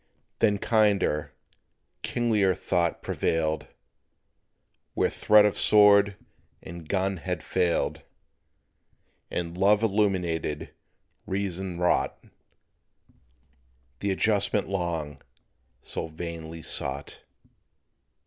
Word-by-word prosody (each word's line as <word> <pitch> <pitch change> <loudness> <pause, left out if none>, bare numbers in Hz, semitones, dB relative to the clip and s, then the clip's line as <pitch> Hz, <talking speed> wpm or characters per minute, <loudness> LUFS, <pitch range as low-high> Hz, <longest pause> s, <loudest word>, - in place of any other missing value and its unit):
Then 105 -2 +3
kinder, 100 -9 +1 0.7
kinglier 110 -6 +1
thought 85 -2 -1
prevailed, 80 -1 -1 1.3
Where - - +1
threat 105 0 +5
of 105 - +1
sword 100 -1 +5 0.5
and 85 -2 -10
gun 95 0 0
had 90 +1 -4
failed; 90 -2 0 1.3
And 85 -1 -4
love 100 +3 +3
illumined 95 -8 0 0.6
reason 95 -2 -3
wrought 90 0 +1 1.8
The 100 - -2
adjustment 100 +1 +1
long 85 -7 -3 0.6
so - - -5
vainly 80 0 -7
sought. 70 +1 -3
95 Hz, 80 wpm, -26 LUFS, 85-100 Hz, 1.8 s, threat